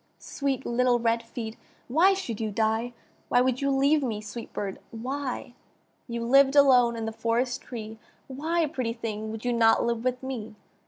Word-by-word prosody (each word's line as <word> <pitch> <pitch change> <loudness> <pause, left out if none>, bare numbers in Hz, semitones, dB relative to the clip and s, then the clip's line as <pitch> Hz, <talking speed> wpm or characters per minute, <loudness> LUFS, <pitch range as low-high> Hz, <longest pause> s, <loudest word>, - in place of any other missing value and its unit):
Sweet 275 -2 -3
little 245 0 +2
red 230 0 +1
feet! 230 -1 -7 0.3
why 345 +10 +4
should 235 - -4
you 220 - -1
die 220 +3 0 0.4
Why 245 - +4
would 255 +1 +1
you 275 - +1
leave 280 +3 +3
me, 230 -6 -2
sweet 215 +2 -8
bird! 195 -2 -4
why? 255 +2 -4 0.5
You 235 -1 -3
lived 275 +3 +5
alone 250 -4 +6
in 225 -1 -4
the 225 - -2
forest 235 +3 -1
tree, 220 -2 -8 0.3
Why, 320 +5 -1
pretty 255 -6 -2
thing! 220 -2 -5
would 225 +1 -7
you 245 - +1
not 225 -1 +4
live 235 -1 -1
with 255 0 -1
me? 235 -5 -5
240 Hz, 175 wpm, -27 LUFS, 225-265 Hz, 0.5 s, alone